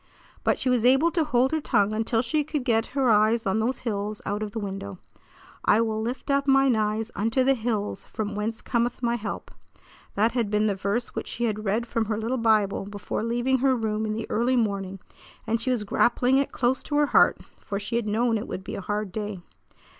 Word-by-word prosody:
But - - +2
she - - -3
was 250 -3 +2
able 270 +7 +5
to 330 -2 +1
hold 255 -3 +2
her 315 -1 0
tongue 205 -5 +2
until 225 +1 0
she 300 +5 0
could 295 -2 -3
get 225 -2 +2
her 260 -4 +4
eyes 215 +2 +3
on 195 +2 +1
those 240 +4 -1
hills 210 -1 -2
out 205 +1 -2
of 215 - -2
the 225 - -7
window. 195 - -5 0.7
"I 210 - +4
will 220 -1 -1
lift 245 +5 -3
up 280 0 +1
mine 270 -2 +4
eyes 215 +1 -1
unto 225 +5 +1
the 270 +1 +4
hills, 220 -5 -2
from 210 -1 -4
whence 215 +2 -3
cometh 240 +1 -1
my 235 0 +2
help." 215 -3 -5 0.6
That 220 +3 +3
had 235 -4 0
been 210 +1 +2
the 210 - +2
verse 200 +5 -2
which - - -5
she 240 - -4
had 215 -2 -1
read 215 +4 0
from 230 -1 -1
her 215 0 -2
little 235 +4 -2
Bible 210 -3 +2
before 205 0 -4
leaving 240 +3 +1
her 265 0 +3
room 220 -2 -1
in 215 - -1
the 225 - -3
early 240 +3 +2
morning 200 -4 -1 0.5
and 225 +1 0
she 255 - -1
was 245 -4 +1
grappling 245 +5 +2
it 275 - 0
close 250 +1 0
to 295 - -4
her 295 0 +4
heart, - - +4 0.2
for 200 -2 -4
she 210 +3 -4
had 235 -2 -2
known 225 +1 +1
it 225 - -6
would 190 - -5
be - - -7
a - - -4
hard 205 0 -3
day. 205 -2 -5
225 Hz, 225 wpm, -26 LUFS, 210-245 Hz, 0.7 s, able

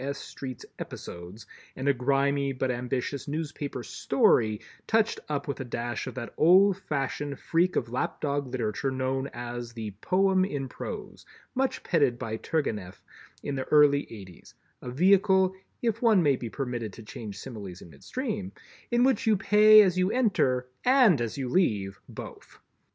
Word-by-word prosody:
S. 140 +1 -3
Street's 130 -3 -8
"Episodes" 90 +5 -8 0.3
and 130 - -4
a 140 - +5
grimy 140 +2 +1
but 130 0 -1
ambitious 125 +2 -3
newspaper 145 -4 -4
"story" 110 -1 +2 0.3
touched 225 0 +2
up 145 -2 -2
with 140 - -3
a - - -3
dash 120 -1 -4
of - - -6
that 125 -2 -6
old 185 +4 +6
fashioned 145 -4 -3
freak 175 +2 +1
of - - 0
lap 125 +2 -3
dog 140 -1 -1
literature 125 +1 -2
known 130 +1 -1
as 120 -1 -6
the 110 -3 -5
"Poem 190 0 +3
in 145 -8 -3
Prose," - - -7 0.3
much 265 +1 -1
petted 140 -8 +2
by 115 -3 -4
Turgenieff 105 - -3 0.4
in 145 - -3
the 130 -1 -3
early 145 -1 +4
eighties, 95 -6 -12 0.3
a 125 - -6
vehicle—if 190 - +2
one 220 -7 +5
may 140 -3 +4
be 120 -2 -6
permitted 120 -5 -4
to 115 - -11
change 105 -1 -8
similes 100 -8 -8
in 85 - -14
midstream—in 240 - -4
which 260 -2 +2
you 215 -2 +4
pay 210 +2 +7
as 185 -2 +1
you 185 +1 +2
enter 155 - +1 0.2
and 245 - +5
as 115 +2 -3
you 135 -2 -2
leave, 105 - 0
both. - - -10
140 Hz, 155 wpm, -27 LUFS, 120-185 Hz, 0.4 s, pay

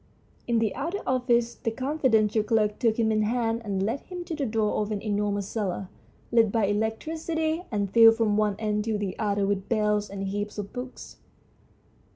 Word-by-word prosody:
In 235 -1 +2
the 225 -2 +1
outer 335 +9 -3
office 240 -2 +1
the - - -3
confidential 225 -4 +1
clerk 215 -1 +1
took 225 -2 +2
him 225 -2 +2
in 215 0 +2
hand 230 +1 0
and 195 -3 -1
led 230 +7 -1
him 360 -1 -7
to 330 - -4
the 285 -3 -2
door 215 -1 0
of 210 0 -3
an 210 - -1
enormous 205 -1 -1
cellar, 195 -4 -3 0.4
lit 230 -3 +4
by 225 -2 +2
electricity 315 - -1
and 205 -4 -1
filled 225 0 +8
from 220 -3 +2
one 210 -1 +2
end 210 -1 -1
to 220 -2 0
the 200 -3 -3
other 205 -2 +1
with 195 -1 -2
bales 210 -2 +1
and 195 0 -5
heaps 205 +2 -4
of 205 -1 -5
books. 250 0 -8
220 Hz, 190 wpm, -26 LUFS, 205-240 Hz, 0.4 s, filled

